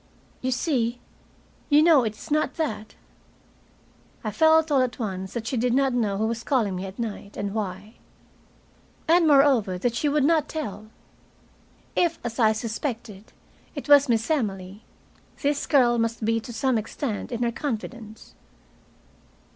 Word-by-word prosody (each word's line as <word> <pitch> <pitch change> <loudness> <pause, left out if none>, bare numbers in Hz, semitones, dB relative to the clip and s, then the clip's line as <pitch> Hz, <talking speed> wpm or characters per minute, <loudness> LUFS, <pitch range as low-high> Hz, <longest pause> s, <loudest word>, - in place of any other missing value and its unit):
"You 255 - -1
see, 245 -3 0 0.7
you 295 +1 +6
know 315 -6 +6
it 215 -2 -3
is - - -12
not 305 +1 +1
that." 220 -10 -4 1.3
I 215 - -2
felt 320 +3 +4
all 275 -2 +4
at 250 -1 -1
once 190 -4 -4
that 235 -2 -4
she 250 - -2
did 245 +1 +1
know 245 -7 +1
who 215 - 0
was 230 +1 -3
calling 225 -9 0
me 185 +2 -4
at 190 - -10
night, 210 -3 -6
and 200 -1 -3
why. 205 0 -5 1.1
And, 335 0 +4
moreover, 270 -10 +4
that 235 +6 -1
she 290 +5 0
would 295 0 +2
not 315 +1 +2
tell. 215 -9 -5 1.1
If, 340 -2 +1
as 235 0 -5
I 220 -2 +5
suspected, 220 -2 -5 0.4
it 285 - -6
was 285 -1 +6
Miss 225 +3 +1
Emily, 200 -7 -2 0.6
this 285 0 0
girl 240 -5 +4
must 230 -1 -1
be 225 +1 +1
to 225 - -9
some 255 0 0
extent 220 +2 -5
in 240 0 -2
her 235 - +1
confidence. 230 -3 -6
235 Hz, 155 wpm, -25 LUFS, 215-280 Hz, 1.3 s, you